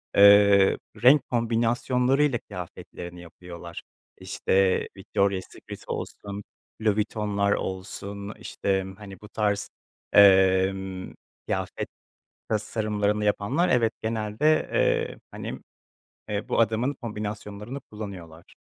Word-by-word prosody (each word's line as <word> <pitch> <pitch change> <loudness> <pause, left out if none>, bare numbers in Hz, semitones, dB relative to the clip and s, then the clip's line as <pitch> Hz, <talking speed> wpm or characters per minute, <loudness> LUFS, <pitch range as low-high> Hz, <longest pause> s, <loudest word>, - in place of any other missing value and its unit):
eee, 100 -1 +7 0.3
renk 135 +2 +6
kombinasyonlarıyla 120 +3 +1
kıyafetlerini 90 -2 -9
yapıyorlar. 85 0 -10 0.4
İşte, 95 -1 +1
Victoria 100 -1 0
Secret - - -11
olsun, 100 0 -5 0.4
Louis 110 -2 +2
Vuitton'lar 105 -1 0
olsun, 100 +2 -4
işte, 95 -1 -1
hani, 100 -3 -11
bu 105 - -12
tarz, 105 -2 -1 0.4
emm, 95 -1 +4 0.3
kıyafet - - -3 0.6
tasarımlarını 105 -1 0
yapanlar, 120 - +1
evet, 115 -2 +3
genelde, 110 +7 +1
eee, - - +1
hani, - - -6 0.7
eee, 105 -1 -3
bu - - +2
adamın 115 +5 +1
kombinasyonlarını 105 0 -6
kullanıyorlar. 95 -8 -10
105 Hz, 95 wpm, -26 LUFS, 95-110 Hz, 0.7 s, eee